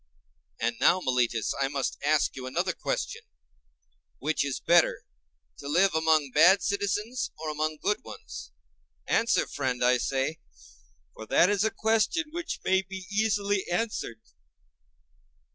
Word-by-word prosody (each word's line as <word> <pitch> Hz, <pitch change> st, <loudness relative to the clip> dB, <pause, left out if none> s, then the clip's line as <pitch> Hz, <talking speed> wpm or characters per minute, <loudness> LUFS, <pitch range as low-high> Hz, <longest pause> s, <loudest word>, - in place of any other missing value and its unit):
And 115 Hz, 0 st, -1 dB
now, 185 Hz, -, +4 dB
Meletus, 125 Hz, -, 0 dB
I 135 Hz, -, +2 dB
must 140 Hz, -1 st, -3 dB
ask 150 Hz, +1 st, +2 dB
you 130 Hz, -1 st, -6 dB
another 130 Hz, -, -1 dB
question: -, -, -3 dB, 1.0 s
Which 155 Hz, +3 st, 0 dB
is 140 Hz, -2 st, -3 dB
better, 170 Hz, -1 st, +3 dB, 0.6 s
to -, -, -8 dB
live 180 Hz, +6 st, +3 dB
among 160 Hz, -3 st, +2 dB
bad 180 Hz, +8 st, +6 dB
citizens, 205 Hz, +5 st, -1 dB
or 155 Hz, 0 st, -4 dB
among 155 Hz, +1 st, -2 dB
good 210 Hz, +6 st, -1 dB
ones? 65 Hz, -, -10 dB, 0.5 s
Answer, 230 Hz, +1 st, +2 dB
friend, 130 Hz, -3 st, -2 dB
I 125 Hz, 0 st, +4 dB
say; 135 Hz, +5 st, -1 dB, 0.7 s
for 110 Hz, -, -10 dB
that 180 Hz, -, +4 dB
is 205 Hz, -1 st, +1 dB
a 220 Hz, -, +2 dB
question 225 Hz, +10 st, 0 dB
which 340 Hz, +1 st, -5 dB
may 190 Hz, 0 st, +3 dB
be 190 Hz, -1 st, -9 dB
easily 205 Hz, -2 st, +1 dB
answered. 175 Hz, -, -2 dB
160 Hz, 135 wpm, -27 LUFS, 135-205 Hz, 1.0 s, bad